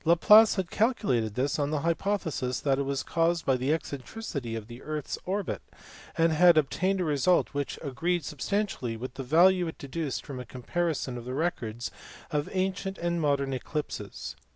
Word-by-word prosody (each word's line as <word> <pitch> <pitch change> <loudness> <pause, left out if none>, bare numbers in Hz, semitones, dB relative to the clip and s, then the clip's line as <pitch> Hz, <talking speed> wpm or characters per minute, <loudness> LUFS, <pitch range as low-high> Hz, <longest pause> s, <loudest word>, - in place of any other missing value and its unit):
Laplace 210 +7 +7
had 185 -4 -2
calculated 130 - +1
this 135 +3 0
on 145 -1 +1
the 150 -1 -1
hypothesis 165 -7 -1
that 135 -2 +1
it - - +2
was 140 0 -1
caused 170 0 +1
by 135 - +3
the 130 +3 0
eccentricity 140 - -4
of 110 -2 -5
the 120 +3 -11
earth 155 -2 -4
s - - -2
orbit, 200 +2 -2 0.6
and 165 -1 +4
had 175 +1 +6
obtained 185 +6 +1
a - - +1
result 155 +3 +2
which 145 -2 -3
agreed 165 +4 -1
substantially 150 - -2
with 125 +2 -6
the - - -6
value 170 +5 +4
deduced 140 0 -4
from 135 -3 -6
a - - -5
comparison 130 +1 -2
of 120 - -10
the 125 +1 -4
records 120 -8 -2 0.4
of 150 -2 -1
ancient 190 +1 -1
and 170 0 -1
modern 140 -2 +1
eclipses. 145 +3 -5
150 Hz, 175 wpm, -28 LUFS, 130-175 Hz, 0.6 s, Laplace